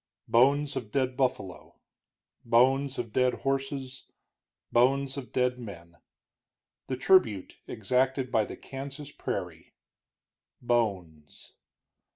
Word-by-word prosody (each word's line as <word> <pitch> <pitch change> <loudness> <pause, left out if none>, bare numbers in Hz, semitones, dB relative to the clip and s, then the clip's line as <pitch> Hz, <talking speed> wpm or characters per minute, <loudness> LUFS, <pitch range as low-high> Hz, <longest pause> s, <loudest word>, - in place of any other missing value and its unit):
Bones 140 +4 +3
of 110 -5 -5
dead 130 -2 0
buffalo, 125 -9 -2 0.7
bones 130 +4 +3
of 115 -3 -5
dead 125 -1 +2
horses, 135 -1 -3 0.6
bones 135 +3 +2
of 135 -3 -7
dead 125 0 0
men. 85 -7 -10 0.9
The 130 - -3
tribute 120 - +3
exacted 130 +4 0
by 110 -2 +2
the - - -9
Kansas 140 +2 -8
prairie: - - -6 0.8
bones. 95 -11 -2
125 Hz, 100 wpm, -28 LUFS, 115-135 Hz, 0.9 s, Bones